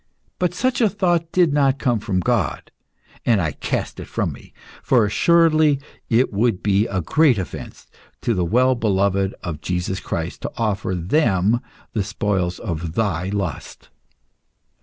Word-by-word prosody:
But 180 -1 0
such 255 +6 0
a 220 - +5
thought 175 -4 0
did 175 -5 +3
not 140 -2 +3
come 120 -5 +1
from 100 -4 -1
God, - - -1 0.5
and 115 -4 +3
I 80 -4 0
cast - - -3
it - - -7
from - - -2
me, - - -15 0.3
for 120 -5 +3
assuredly 155 +5 +4 0.3
it 115 0 +2
would 110 -1 +1
be 105 +2 +2
a 95 -2 -2
great 140 - +3
offence 95 - -7 0.4
to 120 - +1
the 90 -4 0
well 125 +8 +3
beloved 100 -4 +1
of 80 -4 -5
Jesus 90 +2 -2
Christ 85 -3 -4
to - - -4
offer 105 -4 -1
them 100 - +2 0.3
the 105 - 0
spoils 95 -3 -1
of 85 -5 -4
thy 95 -5 0
lust. 100 -3 -5
105 Hz, 155 wpm, -21 LUFS, 95-135 Hz, 0.5 s, a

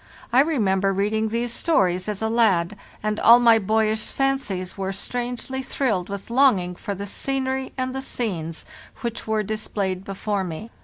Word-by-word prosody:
I 250 - +6
remember 200 -10 +2
reading 210 +3 0
these 235 +1 -1
stories 185 - +1
as 210 +1 -4
a - - +2
lad, 210 -5 +2 0.3
and 215 0 -1
all 235 +1 +8
my 230 -2 +6
boyish 220 +1 +1
fancies 270 -10 -1
were 195 -1 -3
strangely 245 +5 -3
thrilled 220 -9 -1
with 200 +3 -6
longing 235 -9 +4
for 200 +3 -5
the 200 +2 -5
scenery 265 +4 -2
and 255 0 -2
the 265 - -3
scenes 175 -12 -4 0.4
which 235 -3 -4
were 220 -1 +1
displayed 200 -3 -3
before 195 0 -2
me. 185 +6 -6
215 Hz, 160 wpm, -23 LUFS, 195-245 Hz, 0.4 s, all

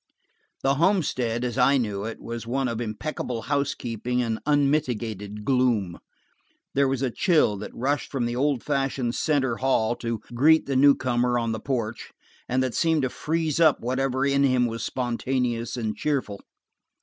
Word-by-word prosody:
The 135 - +3
homestead 130 - +1
as 125 +1 -2
I 135 +2 +5
knew 105 -5 -2
it, 115 - -6
was 115 0 -6
one 130 +2 0
of 115 -1 -3
impeccable 115 +1 -4
housekeeping 125 -3 -2
and 115 -2 -1
unmitigated 120 -8 0
gloom. 120 -9 +1 0.7
There 140 0 +3
was 135 0 -1
a 130 - 0
chill 155 - +2
that 105 - -6
rushed 140 +4 -1
from 130 -4 -1
the 120 0 -2
old 135 -1 0
fashioned 135 -4 -1
center 135 -7 0
hall 120 -2 +1
to 115 -1 -3 0.2
greet 155 +6 +4
the 140 - -2
new 140 +2 +6
comer 125 -1 0
on 115 -1 -1
the 110 - -3
porch, 115 -3 -3 0.4
and 130 +1 +1
that 130 -2 -2
seemed 160 -3 +2
to 130 - +1
freeze 160 -1 -1
up 160 -3 +5
whatever 130 +2 0
in 140 0 +2
him 130 -3 +3
was 115 -1 -3
spontaneous 125 -1 -2
and 110 -3 -2
cheerful. 130 -9 -2
125 Hz, 165 wpm, -25 LUFS, 115-140 Hz, 0.7 s, new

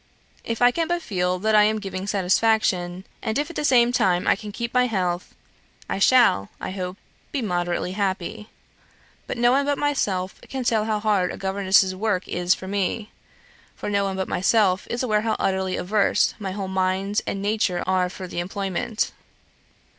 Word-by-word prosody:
If 230 +1 -2
I 245 - +7
can 330 +4 -1
but 345 0 -1
feel 180 -2 0
that 215 +4 0
I 210 - +7
am 215 +1 +3
giving 195 -2 -5
satisfaction, 190 -2 +1 0.2
and 220 +1 -1
if 295 +4 -1
at - - -14
the - - -2
same 245 -4 +4
time 180 -7 +2
I - - +5
can 210 +1 -8
keep 235 +3 -4
my 250 0 +3
health, 180 -5 -2 0.5
I - - -2
shall, 215 - +4
I - - -4
hope, 185 -1 -5 0.3
be 275 - -2
moderately 175 -2 -1
happy. 200 +2 -3 0.8
But - - -4
no 240 +1 +4
one 275 +2 +3
but 285 -1 +1
myself 195 -11 -1
can 265 -1 -3
tell 220 -3 +1
how 215 -1 0
hard 205 -4 +1
a - - -7
governess's 190 -1 +2
work 200 -2 -1
is 175 +1 +1
to 190 - -9
me 200 +2 -2 0.6
for - - -5
no 200 -1 +2
one 195 -1 -2
but 190 - -2
myself 190 -1 +2
is 240 +2 -2
aware 215 -4 +2
how 220 0 0
utterly 190 -1 0
averse 200 +2 +2
my 200 -2 -4
whole 195 0 -4
mind 190 +2 0
and 195 - -2
nature 200 -3 0
are 185 -1 +1
for 185 0 -8
the 175 - -5
employment. 195 +5 -2
200 Hz, 185 wpm, -23 LUFS, 185-225 Hz, 0.8 s, I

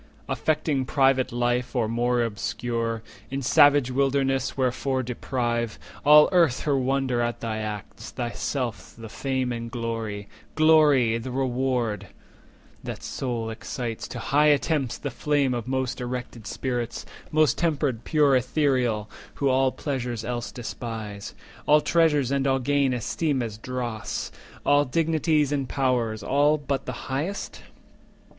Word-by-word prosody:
Affecting 150 -3 0
private 135 -1 +2
life, 120 +1 -1
or 120 -3 +1
more 120 +1 +1
obscure 115 +1 -2 0.3
In 135 +1 -3
savage 145 -1 +5
wilderness, 135 0 +1
wherefore 130 0 0
deprive 120 -2 -2 0.3
All 150 +1 +8
Earth 170 -9 +3
her 145 -2 +1
wonder 130 -2 +1
at 120 0 -1
thy 110 -2 -3
acts, 105 -2 -6
thyself 120 0 -4
The 115 -1 -9
fame 130 0 -2
and 115 -1 -4
glory—glory, 115 +4 +1
the 115 - -6
reward 125 -3 -1 0.8
That - - -6
sole 115 -3 -3
excites 115 0 -5
to - - -7
high 150 +2 +2
attempts 145 -2 +1
the 140 - -5
flame 140 0 +1
Of 120 0 -4
most 130 -1 -2
erected 120 -2 -5
spirits, 120 -3 -3 0.3
most 155 -1 +3
tempered 140 -8 0
pure 145 -3 +3
AEthereal, 125 -5 +1 0.3
who 140 - +1
all 130 0 +3
pleasures 125 -6 -3
else 120 0 -3
despise, 110 -4 -6 0.3
All 150 +1 +7
treasures 150 -5 +2
and 140 0 +1
all 135 0 +3
gain 140 +1 +1
esteem 130 +3 -1
as 110 -2 -6
dross, 120 -3 -4 0.3
And 145 -1 +4
dignities 155 -1 +2
and 140 -3 -1
powers, 120 -6 0
all 145 +5 +3
but 140 -2 -3
the - - -6
highest? 160 +10 -3
130 Hz, 130 wpm, -25 LUFS, 120-140 Hz, 0.8 s, All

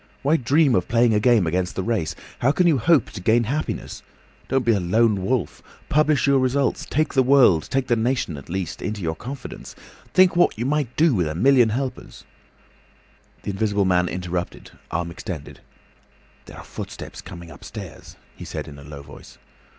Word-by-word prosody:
Why 145 +4 +3
dream 140 +1 +3
of 90 -6 +1
playing 120 0 +3
a 105 - +3
game 115 -4 +4
against 90 +2 -1
the 95 - -2
race? 95 -9 -1 0.2
How 130 - +3
can 180 +4 +2
you 160 -6 +4
hope 155 0 +3
to 100 - -8
gain 115 +4 +3
happiness? 145 +7 -4 0.5
Don't 135 -2 0
be 115 - +4
a 105 - +2
lone 100 +2 +2
wolf. 125 +3 -1 0.3
Publish 150 -2 +3
your 140 -1 +4
results; 130 +1 0
take 155 +2 0
the 130 - +4
world—take 130 - +4
the 120 - +2
nation 115 - -1
at 70 +2 -11
least—into 95 +3 -4
your 80 -1 -1
confidence. 130 - -8 0.4
Think 185 -1 +5
what 175 - +3
you 120 - -2
might 140 -3 -1
do 160 -2 +4
with 90 -7 +1
a 75 - -4
million 125 +3 +4
helpers—" 130 +3 -5 1.2
The - - -3
Invisible 100 0 0
Man 90 -1 +2
interrupted—arm 90 -1 -5
extended. - - -7 0.9
"There - - -12
are - - -9
footsteps - - -8
coming 85 -1 -10
upstairs," 75 - -10 0.2
he - - -10
said - - -6
in 70 -2 -11
a - - -12
low 70 -1 -10
voice. - - -14
115 Hz, 175 wpm, -23 LUFS, 90-135 Hz, 1.2 s, Think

